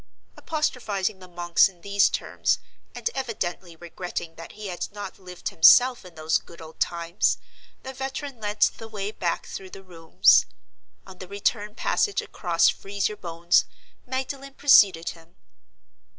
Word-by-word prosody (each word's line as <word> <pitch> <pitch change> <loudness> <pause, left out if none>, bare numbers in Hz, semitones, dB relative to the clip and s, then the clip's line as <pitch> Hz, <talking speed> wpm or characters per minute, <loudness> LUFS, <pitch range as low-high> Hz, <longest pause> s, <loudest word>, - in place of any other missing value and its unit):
Apostrophizing 215 -10 -2
the 185 - -12
monks 175 +1 +3
in 180 -3 -21
these 200 +1 +3
terms, - - 0 0.4
and - - -3
evidently 185 -8 -4
regretting 175 0 -6
that 165 0 -11
he 215 0 -9
had 180 0 -5
not 200 -1 -8
lived 180 -2 -6
himself 245 +9 +6
in 180 -2 -14
those 155 0 +1
good 170 - -16
old 160 0 -12
times, 170 +1 0 0.5
the 265 - -7
veteran 270 0 -5
led 210 0 -5
the 225 - +2
way 210 -2 -4
back 175 -5 -2
through 190 -1 -8
the 195 +1 -11
rooms. 165 -3 +4 0.6
On 190 -1 -13
the 185 - -8
return 205 +2 -2
passage 410 - 0
across 170 -3 +1
"Freeze 200 0 -1
your 210 - -6
Bones," 170 0 +1 0.4
Magdalen 270 +1 -5
preceded 195 -13 +5
him. 165 +1 -13
190 Hz, 150 wpm, -25 LUFS, 170-215 Hz, 0.6 s, himself